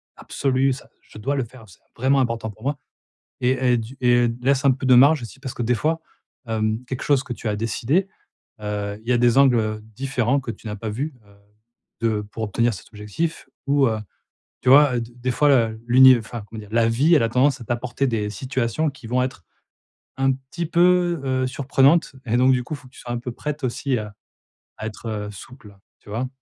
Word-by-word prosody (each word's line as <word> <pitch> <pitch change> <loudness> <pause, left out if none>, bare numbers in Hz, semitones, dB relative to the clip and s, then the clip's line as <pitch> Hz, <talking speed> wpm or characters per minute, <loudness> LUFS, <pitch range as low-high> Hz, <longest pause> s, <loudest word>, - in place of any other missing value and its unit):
absolu, 135 0 0
ça 130 - -11
je - - -16
dois 135 +7 -2
le 135 - 0
faire, 120 0 -13
c'est 90 - -18 0.2
vraiment 135 +3 +2
important 115 -3 -1
pour 110 +1 -13
moi» 140 +2 -1 0.6
et 125 - +3 0.2
et - - +3
du 115 +4 -7
et 120 -1 +4
laisse 135 +2 +2
un 140 - +5
peu 130 +1 -3
de 130 -1 +6
marge 140 +4 +6
aussi 120 +3 -9
parce 135 -2 -6
que 120 - -3
des 120 +2 +2
fois, 160 +6 -1 0.5
hem, 110 +1 -1
quelque 130 0 -5
chose 140 -2 +2
que 125 - -5
tu 120 - -7
as 105 - -1
décidé, 115 - 0 0.5
heu, 105 -1 -3
il 115 - -8
y - - +3
a - - +3
des 120 +1 +3
angles, 135 -3 +6
heu, 110 -1 -2 0.2
différents 135 +1 0
que 125 -3 -5
tu 115 - -11
n'as 105 - -4
pas 110 +2 -5
vu. 135 +7 -4
Heu, 100 0 -21 0.7
de 110 -2 +1
pour 105 +2 -7
obtenir 115 +3 +1
cet 90 - -11
objectif 110 +10 -4 0.2
ou, 140 -1 +4
heu, 110 -1 -1 0.6
tu - - +1
vois, 140 -1 +7
heu, - - -1
d 115 +1 -8
des 125 +1 -2
fois 130 -5 +3 0.2
l'univ 130 0 +7
enfin, 115 0 -7
comment 110 - -9
dire? 105 -1 -11
La 115 0 +3
vie 140 +9 +4
elle 145 - +4
a 115 - +1
tendance 135 +3 +2
à - - -8
t'apporter 120 +3 -2
des 110 -4 -1
situations 125 +6 -1
qui 135 -3 -12
vont 125 +2 +1
être 130 -9 -5 0.7
un 135 0 +3
petit 135 +6 -6
peu, 175 0 +3
heu, 130 -1 0
surprenantes 140 +4 +2
et 120 0 +1
donc, 130 +1 +5
du 125 -1 0
coup, 130 - -7
il - - -9
faut 140 -2 -16
que 125 - -22
tu - - -14
sois 120 - -7
un 120 - -2
peu 125 +1 -5
prête 150 +3 -5
aussi 130 +1 -1
à 105 -1 -8 0.6
à 110 - -5
être 105 -1 -5
souple, 105 0 -13 0.2
tu - - -18
vois? 115 +5 -2
125 Hz, 225 wpm, -22 LUFS, 115-135 Hz, 0.7 s, vois